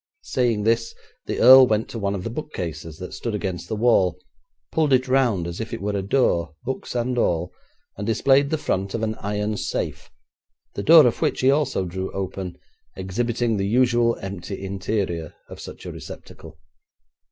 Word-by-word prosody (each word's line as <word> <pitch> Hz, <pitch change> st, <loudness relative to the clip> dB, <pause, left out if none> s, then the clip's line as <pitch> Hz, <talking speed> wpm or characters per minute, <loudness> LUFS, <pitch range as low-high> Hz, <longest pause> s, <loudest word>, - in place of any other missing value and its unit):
Saying 120 Hz, -5 st, 0 dB
this 115 Hz, +1 st, 0 dB, 0.3 s
the -, -, -3 dB
earl 130 Hz, +1 st, +9 dB
went 110 Hz, -1 st, 0 dB
to 115 Hz, -, -6 dB
one 100 Hz, -1 st, -1 dB
of 95 Hz, -, -5 dB
the 115 Hz, -, -4 dB
bookcases 85 Hz, -, -6 dB
that 90 Hz, -, -8 dB
stood 105 Hz, +4 st, -4 dB
against 95 Hz, -4 st, -4 dB
the 110 Hz, -, -3 dB
wall, 105 Hz, -6 st, +3 dB, 0.5 s
pulled 155 Hz, -4 st, +2 dB
it 130 Hz, +1 st, +3 dB
round 125 Hz, -9 st, +2 dB
as 85 Hz, +4 st, -5 dB
if 115 Hz, +1 st, -4 dB
it -, -, -7 dB
were 105 Hz, +1 st, -2 dB
a 100 Hz, -, 0 dB
door, 85 Hz, -, +1 dB
books 130 Hz, -1 st, -5 dB
and 120 Hz, +1 st, 0 dB
all, 85 Hz, -3 st, 0 dB, 0.4 s
and 100 Hz, +1 st, -4 dB
displayed 135 Hz, +5 st, +3 dB
the 160 Hz, -, 0 dB
front 95 Hz, -8 st, -2 dB
of 115 Hz, -, -3 dB
an 110 Hz, 0 st, 0 dB
iron 105 Hz, +1 st, -2 dB
safe, -, -, -4 dB, 0.6 s
the -, -, -4 dB
door 155 Hz, +8 st, +8 dB
of 120 Hz, -, 0 dB
which -, -, 0 dB
he 130 Hz, +1 st, +5 dB
also 140 Hz, -9 st, 0 dB
drew 95 Hz, +2 st, -4 dB
open, 95 Hz, -1 st, -5 dB, 0.4 s
exhibiting 115 Hz, +4 st, -1 dB
the 100 Hz, 0 st, -1 dB
usual 120 Hz, 0 st, +2 dB
empty 95 Hz, 0 st, -6 dB
interior 95 Hz, -4 st, -3 dB
of -, -, -11 dB
such -, -, -10 dB
a -, -, -5 dB
receptacle. 80 Hz, -1 st, -11 dB
105 Hz, 180 wpm, -23 LUFS, 95-120 Hz, 0.6 s, earl